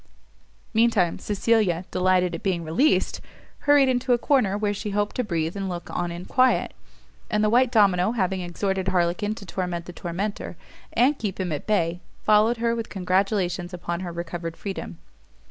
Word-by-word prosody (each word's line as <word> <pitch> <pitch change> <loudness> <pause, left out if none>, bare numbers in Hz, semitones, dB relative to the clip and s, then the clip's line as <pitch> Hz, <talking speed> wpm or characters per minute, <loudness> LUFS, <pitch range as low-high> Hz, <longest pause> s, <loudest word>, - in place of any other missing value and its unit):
Mean 230 +1 +5
time 180 -7 +1
Cecilia, 205 -4 +1
delighted 185 -1 +2
at 165 - -5
being 180 -4 -1
released, 210 - +1 0.5
hurried 290 -2 +6
into 250 0 +2
a - - +4
corner, 240 -7 +2
where 205 -1 0
she 210 +1 -4
hoped 205 +1 -1
to 250 - +1
breathe 165 -4 -2
and 195 -1 -3
look 175 -1 -6
on 175 -1 -1
in 175 +1 -7
quiet; 255 +3 +2 0.6
and 210 -1 +1
the 215 - +2
white 245 +1 +4
domino 200 -2 +3
having 190 -4 0
exhorted 190 +2 -2
Harlequin 185 +3 +1
to 200 - -10
torment 180 -2 -3
the 180 - -9
tormentor, 190 +5 -4 0.4
and 270 +4 +3
keep 200 -4 -3
him 185 -3 -2
at 145 - -4
bay, 175 -5 +1 0.2
followed 215 +3 +4
her 230 0 0
with 230 -1 -4
congratulations 185 -1 0
upon 170 -1 -4
her 180 -2 -5
recovered 170 -1 -5
freedom. 190 - -6
190 Hz, 175 wpm, -24 LUFS, 175-215 Hz, 0.6 s, hurried